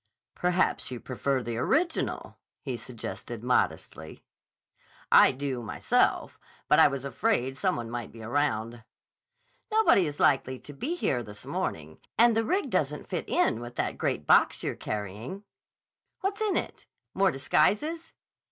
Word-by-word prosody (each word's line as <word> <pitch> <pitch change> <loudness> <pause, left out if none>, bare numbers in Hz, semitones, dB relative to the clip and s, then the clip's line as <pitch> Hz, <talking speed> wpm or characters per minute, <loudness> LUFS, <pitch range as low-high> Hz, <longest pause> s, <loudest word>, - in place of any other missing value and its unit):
"Perhaps 180 0 0
you 125 -2 -6
prefer 130 +1 -2
the 115 0 -4
original," 325 - -1 0.2
he 130 -3 -3
suggested 120 -1 -7
modestly. 100 -9 -1 0.9
"I - - +8
do, 130 -2 -4
myself. 110 - 0 0.3
But - - +5
I - - +8
was 140 -1 -4
afraid 140 - 0
some 130 - 0
one 120 -1 -4
might 120 -2 -5
be 115 0 -11
around." 115 -2 -1 0.9
"Nobody 430 - +4
is 145 -1 -6
likely 130 -2 +2
to 145 - -12
be 280 - -3
here 130 - 0
this 105 -3 -10
morning. 80 0 -4 0.2
And 235 +1 +5
the 225 - +2
rig 375 - 0
doesn't - - -1
fit - - -3
in 360 - +2
with 120 0 -8
that - - -2
great 75 - -1
box - - +4
you're - - -1
carrying. 105 - -5 0.8
What's 395 +2 -2
in 425 -3 +1
it? - - -5 0.3
More 195 0 +3
disguises?" 215 - +1
130 Hz, 145 wpm, -28 LUFS, -, 0.9 s, I